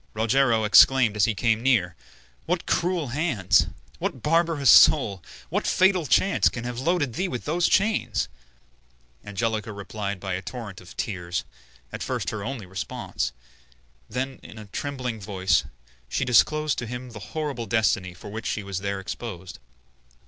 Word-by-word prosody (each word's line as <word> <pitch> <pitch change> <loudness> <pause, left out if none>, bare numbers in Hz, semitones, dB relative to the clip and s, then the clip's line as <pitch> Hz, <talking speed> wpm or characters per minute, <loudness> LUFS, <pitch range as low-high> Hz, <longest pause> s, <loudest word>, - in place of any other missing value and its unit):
Rogero 115 +1 +2
exclaimed 115 +1 +6
as 105 -2 +4
he 115 - -1
came 110 +1 +1
near, 110 -10 +2 0.5
"What - - -1
cruel 175 -5 0
hands, 120 - +2 0.3
what 130 - -3
barbarous 165 -4 +3
soul, 105 - +6 0.3
what - - -1
fatal 185 -4 +3
chance 195 +9 +3
can 120 - -6
have 120 0 -4
loaded 145 -3 0
thee 185 +11 -1
with 125 -9 -5
those 170 +3 +1
chains?" 190 - +1 1.0
Angelica 110 +1 -2
replied 100 -1 -5
by 95 0 -4
a 90 - -3
torrent 105 -4 -8
of 90 - -14
tears, 90 -5 -3 0.5
at - - -6
first - - -2
her 110 -2 -5
only 120 -3 -5
response; 90 -8 -4 0.8
then, 130 +2 -3
in - - -12
a 110 - -9
trembling 125 0 -4
voice, 95 -6 +1 0.4
she 135 - -1
disclosed 150 +5 +3
to 120 - -5
him 125 +1 -6
the 110 - -9 0.2
horrible 140 -7 -3
destiny 95 -4 +1
for 105 - -10
which 110 +2 -5
she 110 - -2
was 100 -1 -4
there 100 0 -3
exposed. 95 -2 -7
115 Hz, 155 wpm, -25 LUFS, 100-135 Hz, 1.0 s, exclaimed